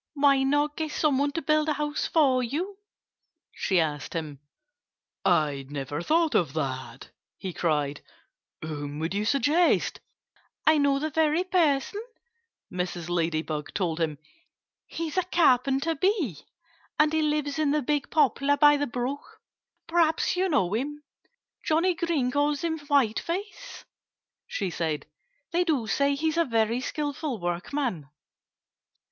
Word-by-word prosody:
"Why 280 -1 +4
not 290 +2 +1
get 315 -1 -2
some 295 -4 +1
one 285 0 +1
to 330 - -3
build 305 +1 +2
a - - +2
house 295 0 -2
for 270 -6 +3
you?" 345 - -3 0.7
she 190 -3 +1
asked 150 -2 -2
him. 150 -4 -4 0.8
"I 150 -7 +1
never 145 +1 -4
thought 320 - +2
of 155 -7 +1
that!" 130 -4 -4 0.3
he 185 -2 -5
cried. 150 -4 -1 0.6
"Whom 145 -2 -5
would 160 +3 -2
you 205 +1 -1
suggest?" 290 +8 +2 0.7
"I 310 -1 +5
know 280 -1 +3
the 310 +2 -2
very 320 +3 +2
person!" 350 0 +1 0.7
Mrs. 180 -2 -3
Ladybug 160 -3 -2
told 170 -4 -1
him. 155 -3 -1 0.7
"He's 330 0 -5
a 370 - +3
Carpenter 275 -3 +3
Bee; 320 - 0 0.6
and 305 +1 +3
he 315 - +2
lives 300 -1 0
in 305 -2 +2
the 295 0 +1
big 290 +1 -1
poplar 285 -1 +2
by 295 +1 +6
the 290 0 -1
brook. 250 +4 -5 0.5
Perhaps 330 0 +2
you 375 +1 +1
know 200 - +1
him. 295 +6 -3 0.6
Johnnie 335 +4 +2
Green 330 -7 0
calls 290 +2 0
him 320 -1 -1
Whiteface," 315 - -1 0.6
she 195 -4 -3
said. 160 -3 -2 0.5
"They 350 +1 +2
do 300 -9 0
say 280 +5 +1
he's 315 +3 -1
a 335 - +3
very 230 0 +1
skillful 290 -3 -3
workman." 175 - -3
280 Hz, 140 wpm, -27 LUFS, -, 0.8 s, by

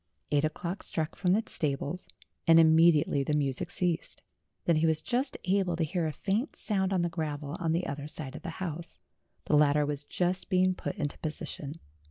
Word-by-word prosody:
Eight 145 0 +3
o'clock 170 +4 -2
struck 160 -1 -3
from 180 -2 +2
the 220 +3 +2
stables, 145 +2 -2 0.4
and 165 0 +8
immediately 160 -3 +5
the 150 +2 0
music 135 -3 -1
ceased. 175 -2 -2 0.4
Then 170 -2 +3
he 160 +1 +3
was 160 -1 +2
just 255 - -1
able 185 -2 +2
to 165 - 0
hear 165 +1 -1
a - - -1
faint 205 - -1
sound 190 -3 0
on 185 -3 +2
the - - +2
gravel 150 -3 -4
on 165 -2 0
the 170 +2 0
other 145 +1 -4
side 150 -2 -6
of - - -7
the 185 - -5
house; 170 -2 -5 0.5
the - - +2
ladder 150 0 +4
was 145 0 -3
just 180 +4 -1
being 185 0 +3
put - - -5
into 145 -2 -3
position. 150 -1 -5
165 Hz, 195 wpm, -30 LUFS, 150-180 Hz, 0.5 s, and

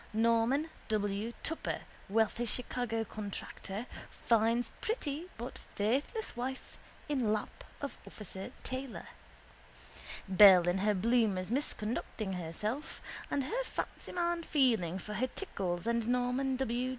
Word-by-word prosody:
Norman 230 +7 +3 0.2
W. 210 0 0
Tupper, 325 - -2 0.3
wealthy 225 +3 +2
Chicago 235 -1 -1
contractor, 205 +1 -5 0.2
finds 230 +1 +2
pretty 335 - -2
but 240 +2 -6 0.2
faithless 270 - 0
wife 260 +2 -4 0.3
in 260 -7 +1
lap 215 - -2 0.2
of 280 - -4
officer 195 -2 -7
Taylor. 260 -1 -5 1.2
Belle 185 -2 +9
in 175 +2 +2
her 210 +1 +3
bloomers 210 -2 +2
misconducting 220 -5 -2
herself, 210 - -3 0.3
and 280 - +1
her 480 - -1
fancyman 345 -7 -2
feeling 225 - +3
for 210 +3 -6
her 240 +5 +1
tickles 185 - -2
and 235 -1 +1
Norman 250 +2 +1
W. 250 -1 0
230 Hz, 115 wpm, -33 LUFS, 205-265 Hz, 1.2 s, Belle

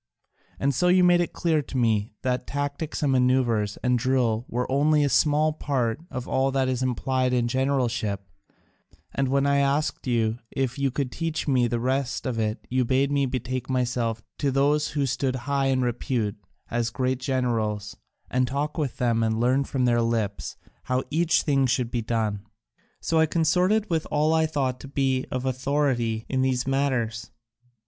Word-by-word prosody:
And 140 0 +1
so 160 +8 +1
you 180 0 +5
made 175 0 +5
it 175 - -2
clear 160 -3 +1
to 135 - -6
me 110 -3 +1
that 125 -1 -1
tactics 145 +2 -3
and 140 - +2
manoeuvres 125 -5 +2
and 125 -1 +2
drill 120 -3 +1
were 125 +1 -2
only 150 +2 +3
a 140 - +2
small 150 +2 +3
part 130 -5 -1
of 125 -2 -5
all 135 +1 +1
that 135 -1 +1
is 130 -1 -1
implied 130 0 0
in 120 -1 +2
generalship, 120 -6 0 0.9
and 135 -1 0
when 135 +1 +2
I 140 0 +3
asked 140 +1 0
you 115 -1 +1
if 135 0 -2
you 140 0 +2
could 130 0 -3
teach 165 +1 -3
me 125 -4 +3
the 120 0 -1
rest 130 +2 -1
of 125 -4 -2
it 110 +1 -2
you 130 +1 +1
bade 135 +3 +1
me 140 -1 +2
betake 125 0 -3
myself 120 -3 -1 0.2
to 145 - +1
those 145 +3 +2
who 140 - +2
stood 130 0 -1
high 140 -1 +1
in 130 -1 +1
repute 120 -3 -1 0.4
as 115 0 0
great 130 +2 -1
generals, 115 -6 -1 0.3
and 130 0 +1
talk 145 +5 -2
with 140 -5 -2
them 115 -2 +1
and 110 0 0
learn 130 +3 +2
from 130 -2 -1
their 120 -1 +3
lips 115 -3 -2 0.3
how 130 0 0
each 165 +2 +2
thing 135 -3 +2
should 120 -1 0
be 120 - -1
done. 110 -3 -1 0.6
So 165 - +1
I 160 - +4
consorted 180 +7 +2
with 165 -4 -1
all 150 +2 +2
I 160 0 +3
thought 135 -5 -1
to - - -9
be 135 -2 0
of 130 0 -3
authority 130 -4 0
in 130 -1 0
these 130 -1 +1
matters. 130 -5 -1
130 Hz, 180 wpm, -25 LUFS, 120-140 Hz, 0.9 s, you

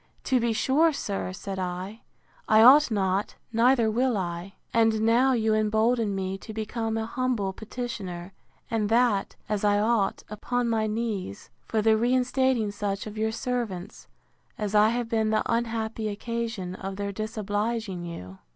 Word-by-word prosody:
To 260 -2 +2
be 235 0 +1
sure, 280 +8 +3
sir, 200 -9 -3
said 190 +1 -6
I, 185 +4 -4 0.5
I 220 0 +6
ought 280 +5 +8
not, 195 -2 0 0.2
neither 230 -1 +4
will 245 0 +1
I. 175 +1 -4 0.2
And 225 -1 +3
now 240 +4 +4
you 220 -2 +2
embolden 215 0 +2
me 190 0 -3
to 220 0 -9
become 225 +1 -2
an 220 - -1
humble 230 -5 -1
petitioner, 195 -6 -6 0.4
and 215 -2 0
that, 230 -3 +2
as 210 -1 -2
I 205 0 +4
ought, 215 -2 +1
upon 245 +3 -2
my 220 -2 +1
knees, 210 - -4 0.2
for 220 -2 0
the 220 0 +4
reinstating 250 -1 +1
such 200 -1 -3
of 215 -1 -7
your 220 0 0
servants, 225 -7 -4 0.5
as 210 -1 -3
I 210 +1 +6
have 240 0 -1
been 220 -1 +1
the 215 0 +2
unhappy 225 -1 -1
occasion 225 -3 -4
of 190 +1 -6
their 200 0 -3
disobliging 215 -2 -3
you. 95 - -8
220 Hz, 155 wpm, -26 LUFS, 200-235 Hz, 0.5 s, ought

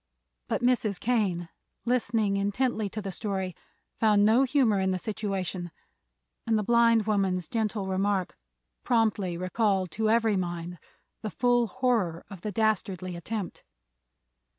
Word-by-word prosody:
But - - -1
Mrs. 230 -6 +2
Kane, 195 -8 0 0.4
listening 230 -4 +1
intently 205 +2 0
to 215 +1 -6
the 195 - -4
story, 190 0 -3 0.4
found 210 -2 +4
no 225 +4 +5
humor 250 -7 +3
in 190 0 +1
the 185 - 0
situation, 190 -3 -3 0.8
and 225 -1 +3
the 210 - 0
blind 230 -1 +4
woman's 195 -4 0
gentle 220 -4 -1
remark 190 0 0 0.5
promptly 215 -7 +1
recalled 185 0 0
to 220 0 0
every 225 -2 +3
mind 175 -1 -4 0.4
the 215 - -3
full 245 +1 +2
horror 225 -10 0
of 190 -3 -9
the 210 - -3
dastardly 190 -4 -1
attempt. 195 +2 -5
205 Hz, 130 wpm, -28 LUFS, 185-225 Hz, 0.8 s, no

